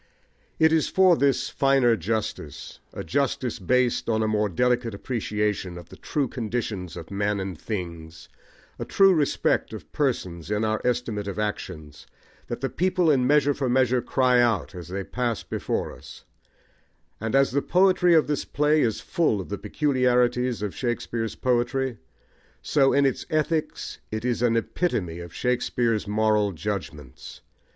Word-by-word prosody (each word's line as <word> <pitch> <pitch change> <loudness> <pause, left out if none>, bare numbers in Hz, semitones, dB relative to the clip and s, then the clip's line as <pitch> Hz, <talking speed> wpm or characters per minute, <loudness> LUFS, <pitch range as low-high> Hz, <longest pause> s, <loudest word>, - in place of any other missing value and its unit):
It 160 0 +4
is 160 -2 +2
for 185 -2 +5
this 140 -3 +1
finer 135 -4 +3
justice, 100 -7 -4
a - - -6
justice 130 -3 -1
based 125 +5 +1
on 110 -1 +1
a - - +1
more 105 -1 +1
delicate 120 +3 0
appreciation 105 -5 -2
of 85 -1 -11
the - - -12
true 145 -3 -2
conditions 110 -7 -4
of 80 - -9
men 100 +1 0
and 95 -1 -4
things, 85 -4 -6 0.5
a - - -2
true 195 -1 +4
respect 150 -5 +1
of - - -9
persons 95 - -2
in 105 +1 0
our 110 0 -1
estimate 120 -4 -1
of 100 - -5
actions, 85 -8 -5 0.4
that 120 0 -5
the 135 - 0
people 180 -2 +2
in 130 -3 +2
Measure 145 0 +4
for 135 -2 -2
Measure 125 0 +2
cry 125 -1 +3
out 115 -8 +1
as 90 -3 -8
they 95 +2 -4
pass 120 +1 -2
before - - -3
us; - - -13 1.0
and 110 +4 -2
as 135 0 +4
the 140 +2 +1
poetry 180 -1 +4
of 160 - +5
this 150 -1 -1
play 150 +1 +2
is 115 -5 0
full 160 - 0
of 95 - -7
the 100 - -3
peculiarities 125 -5 +1
of 105 - -3
Shakespeare's 120 -2 -3
poetry, 125 0 0 0.6
so 135 -2 +3
in 140 0 +3
its 135 - -1
ethics 155 0 -1
it 110 +2 -4
is 120 -2 0
an 115 -1 +3
epitome 100 - -2
of 85 -1 -8
Shakespeare's 120 -1 0
moral 105 -1 +2
judgments. 80 -8 -6
120 Hz, 160 wpm, -25 LUFS, 105-135 Hz, 1.0 s, for